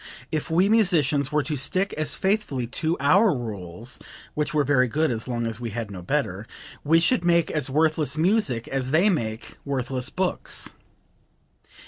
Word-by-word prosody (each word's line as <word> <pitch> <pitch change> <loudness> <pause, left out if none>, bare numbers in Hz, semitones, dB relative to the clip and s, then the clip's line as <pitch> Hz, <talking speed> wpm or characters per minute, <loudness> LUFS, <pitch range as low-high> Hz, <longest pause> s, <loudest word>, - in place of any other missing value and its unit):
If 155 +1 -2
we 175 +4 +3
musicians 160 - +2
were 150 -1 +2
to 150 +2 -2
stick 185 +8 -1
as 155 -1 -1
faithfully 190 - 0
to 155 +8 -1
our 180 - +4
rules 110 0 -6 0.3
(which 150 -1 -1
were 150 -1 +2
very 130 -2 +3
good 155 +4 +1
as 115 +1 -3
long 120 -2 -2
as 115 -1 -4
we 120 -1 -4
had 110 -1 -5
no 95 -2 -7
better) 85 - -2 0.4
we 165 +3 +4
should 175 +5 +2
make 170 -1 +3
as 150 -3 -1
worthless 155 0 +1
music 160 - +1
as 135 -1 -2
they 175 +9 +4
make 110 -9 -4
worthless 130 -1 -2
books." 185 +1 -1
145 Hz, 165 wpm, -24 LUFS, 125-165 Hz, 0.4 s, our